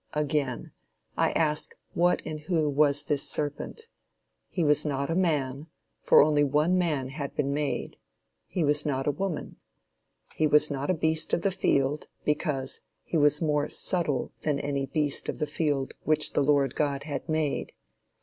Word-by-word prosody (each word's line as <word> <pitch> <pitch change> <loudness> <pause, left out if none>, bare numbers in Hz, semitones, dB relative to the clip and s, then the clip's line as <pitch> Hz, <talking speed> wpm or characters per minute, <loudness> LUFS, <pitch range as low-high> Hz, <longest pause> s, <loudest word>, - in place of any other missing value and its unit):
Again, 145 -4 -1 0.4
I - - +2
ask 150 -2 0 0.2
what 175 +1 +2
and 155 -1 -4
who 155 0 0
was 145 0 +3
this 145 -1 0
serpent? 150 - -3 0.6
He 175 - -1
was 150 0 +3
not 140 0 -1
a - - 0
man, 150 -5 0 0.3
for - - +6
only 150 -1 +3
one 150 +5 +2
man 155 -8 0
had 140 0 -5
been 140 -1 0
made. 145 0 -2 0.5
He 175 - -1
was 145 0 +2
not 135 -2 -1
a 145 - +2
woman. 190 +1 -4 0.8
He 155 - +2
was 150 0 +4
not 140 0 -3
a 185 - +3
beast 160 0 -1
of 170 - +1
the 195 - +2
field, 145 -6 0 0.2
because 150 -3 -1 0.2
"he - - -5
was 150 0 +4
more 150 -1 +1
subtile 160 -8 0
than 150 -2 0
any 140 -1 -2
beast 145 +1 -1
of - - -3
the - - 0
field 145 -3 -1
which 155 0 +1
the - - +2
Lord 140 -2 +3
God 140 -2 -1
had 150 +3 -5
made." 155 -2 -1
150 Hz, 170 wpm, -28 LUFS, 140-155 Hz, 0.8 s, for